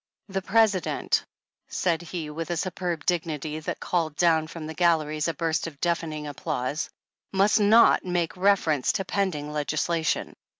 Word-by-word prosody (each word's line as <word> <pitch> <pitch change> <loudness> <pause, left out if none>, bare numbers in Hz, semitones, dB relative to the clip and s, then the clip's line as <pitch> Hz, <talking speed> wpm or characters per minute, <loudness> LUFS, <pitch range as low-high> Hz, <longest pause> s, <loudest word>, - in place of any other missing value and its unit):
" - - -58
The 195 - +1
President," 200 -2 +2 0.4
said 170 -2 0
he 165 -3 -5
with 165 +2 -5
a 175 - -1
superb 175 -2 -3
dignity 155 -3 -1
that 155 - -4
called 165 -4 -1
down 160 -1 +3
from 165 -1 -8
the 160 - -5
galleries 155 -2 +1
a 165 - 0
burst 160 +1 -1
of 145 -4 -10
deafening 165 -3 -1
applause, 145 -1 -3 0.5
^'must 200 +3 +4
not 220 +3 +6
make 175 -4 -1
reference 180 -8 +2
to 195 -3 -2
pending 170 -7 -1
legislation. 155 +2 -1
165 Hz, 155 wpm, -26 LUFS, 155-180 Hz, 0.5 s, not